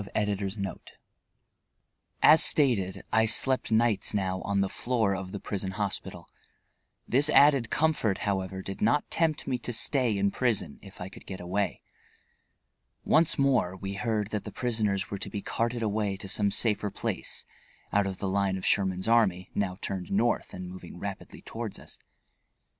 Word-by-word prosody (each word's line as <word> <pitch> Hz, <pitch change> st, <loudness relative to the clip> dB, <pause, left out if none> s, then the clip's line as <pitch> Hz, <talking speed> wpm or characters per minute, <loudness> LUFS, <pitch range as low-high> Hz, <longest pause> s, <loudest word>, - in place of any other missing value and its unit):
EDITOR.] 105 Hz, -2 st, 0 dB, 1.7 s
As 160 Hz, -, +9 dB
stated, 100 Hz, -10 st, +2 dB
I 110 Hz, 0 st, +4 dB
slept 130 Hz, +2 st, +2 dB
nights 110 Hz, -2 st, +2 dB
now 95 Hz, -2 st, -1 dB
on 100 Hz, -1 st, 0 dB
the 100 Hz, -, +1 dB
floor 110 Hz, -2 st, 0 dB
of 95 Hz, 0 st, -6 dB
the 100 Hz, -, -5 dB
prison 95 Hz, -1 st, -4 dB
hospital. 100 Hz, 0 st, -3 dB, 0.8 s
This 140 Hz, +4 st, +4 dB
added 140 Hz, -6 st, +5 dB
comfort, 150 Hz, -11 st, +1 dB
however, 95 Hz, -1 st, -2 dB
did 95 Hz, -, -7 dB
not 120 Hz, +7 st, +2 dB
tempt 160 Hz, -2 st, +1 dB
me 125 Hz, -, -1 dB
to 120 Hz, -, -5 dB
stay 120 Hz, -1 st, +2 dB
in 100 Hz, 0 st, +1 dB
prison, 120 Hz, -4 st, -1 dB
if 100 Hz, -2 st, -13 dB
I 90 Hz, -, -5 dB
could -, -, -14 dB
get 95 Hz, -, -6 dB
away. 95 Hz, +2 st, -2 dB, 1.2 s
Once 160 Hz, 0 st, +3 dB
more 130 Hz, -10 st, +2 dB
we 95 Hz, +1 st, -5 dB
heard 110 Hz, -1 st, -2 dB
that 105 Hz, -2 st, -2 dB
the -, -, -7 dB
prisoners 105 Hz, -6 st, -1 dB
were 100 Hz, -, -4 dB
to -, -, -4 dB
be 100 Hz, -, -5 dB
carted 115 Hz, 0 st, -2 dB
away 105 Hz, -2 st, -1 dB
to 100 Hz, -, -9 dB
some 100 Hz, +1 st, +1 dB
safer 105 Hz, 0 st, +2 dB
place, -, -, -4 dB, 0.5 s
out 100 Hz, -1 st, +3 dB
of 95 Hz, -1 st, -4 dB
the 100 Hz, -, -3 dB
line 95 Hz, 0 st, 0 dB
of 95 Hz, -, -6 dB
Sherman's 95 Hz, -1 st, +1 dB
army, 95 Hz, -6 st, +2 dB
now 95 Hz, -3 st, -1 dB
turned 95 Hz, -2 st, -4 dB
North 115 Hz, +4 st, +1 dB
and 90 Hz, 0 st, -7 dB
moving 90 Hz, -1 st, -10 dB
rapidly 100 Hz, +1 st, -7 dB
toward -, -, -6 dB
us. -, -, -13 dB
100 Hz, 165 wpm, -28 LUFS, 95-115 Hz, 1.7 s, As